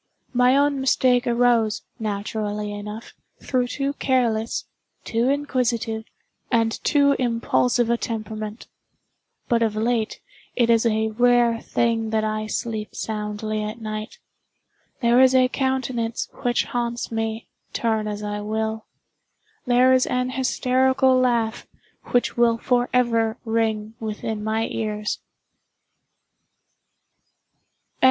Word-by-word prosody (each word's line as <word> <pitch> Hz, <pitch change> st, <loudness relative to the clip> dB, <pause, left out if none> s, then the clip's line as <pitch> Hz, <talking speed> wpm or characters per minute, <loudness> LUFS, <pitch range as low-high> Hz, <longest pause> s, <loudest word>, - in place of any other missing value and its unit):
My 250 Hz, +2 st, +4 dB
own 285 Hz, -1 st, +2 dB
mistake 255 Hz, -1 st, +3 dB
arose, 235 Hz, -3 st, +2 dB, 0.2 s
naturally 210 Hz, 0 st, -3 dB
enough, 210 Hz, +2 st, -7 dB, 0.3 s
through 250 Hz, -2 st, 0 dB
too 275 Hz, +2 st, -2 dB
careless, 235 Hz, -5 st, 0 dB, 0.4 s
too 235 Hz, +3 st, 0 dB
inquisitive, 245 Hz, -6 st, -1 dB, 0.5 s
and 225 Hz, -2 st, +1 dB
too 280 Hz, -1 st, +4 dB
impulsive 240 Hz, 0 st, +1 dB
a 235 Hz, -, +2 dB
temperament. 215 Hz, -1 st, -5 dB, 0.8 s
But 235 Hz, -1 st, +2 dB
of 220 Hz, -2 st, +1 dB
late, 225 Hz, 0 st, 0 dB, 0.4 s
it 235 Hz, -1 st, +3 dB
is 230 Hz, 0 st, +4 dB
a 220 Hz, 0 st, +1 dB
rare 240 Hz, 0 st, +3 dB
thing 230 Hz, -1 st, 0 dB
that 220 Hz, 0 st, 0 dB
I 215 Hz, 0 st, -2 dB
sleep 215 Hz, -1 st, -4 dB
soundly 215 Hz, 0 st, -3 dB
at 215 Hz, +2 st, -5 dB
night. 215 Hz, -1 st, -6 dB, 0.9 s
There 235 Hz, +2 st, +5 dB
is 260 Hz, 0 st, +5 dB
a 255 Hz, -1 st, +5 dB
countenance 255 Hz, -4 st, -1 dB
which 240 Hz, -1 st, +1 dB
haunts 235 Hz, -1 st, -3 dB
me, 225 Hz, 0 st, -3 dB, 0.2 s
turn 220 Hz, -2 st, 0 dB
as 210 Hz, 0 st, -4 dB
I 210 Hz, 0 st, -3 dB
will. 220 Hz, +1 st, -3 dB, 0.8 s
There 250 Hz, +1 st, +5 dB
is 255 Hz, 0 st, +3 dB
an 250 Hz, 0 st, -1 dB
hysterical 260 Hz, 0 st, +2 dB
laugh 240 Hz, -3 st, +1 dB, 0.4 s
which 245 Hz, -, +1 dB
will 235 Hz, -1 st, +3 dB
forever 240 Hz, -2 st, +1 dB
ring 220 Hz, -1 st, -1 dB
within 215 Hz, -1 st, -4 dB
my 220 Hz, +1 st, 0 dB
ears. 210 Hz, -2 st, -3 dB
230 Hz, 115 wpm, -23 LUFS, 220-250 Hz, 0.9 s, There